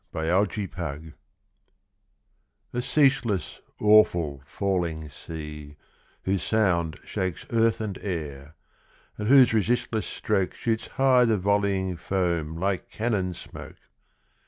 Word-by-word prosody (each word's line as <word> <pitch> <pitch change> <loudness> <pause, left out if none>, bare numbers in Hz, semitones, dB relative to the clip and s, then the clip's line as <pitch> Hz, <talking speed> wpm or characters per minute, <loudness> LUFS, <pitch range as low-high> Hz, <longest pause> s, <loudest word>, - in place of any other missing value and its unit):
NIAGARA 85 -3 -1 1.6
A 120 - -1
ceaseless, 125 - +1 0.2
awful, 90 -9 +4
falling 85 -6 -2
sea, 75 -1 -8 0.5
whose 95 0 0
sound 90 -7 +1
Shakes 95 -2 -3
earth 115 -1 +2
and 105 -3 -4
air, 75 -5 -5 0.6
and 105 - -2
whose 130 -2 +7
resistless 110 +1 0
stroke 95 -4 -1
Shoots 115 -1 -2
high 130 -2 +5
the 110 -2 +2
volleying 100 -2 0
foam 85 -4 -1
like 95 +1 -1
cannon 100 -6 -1
smoke! - - -11
95 Hz, 100 wpm, -26 LUFS, 80-110 Hz, 1.6 s, whose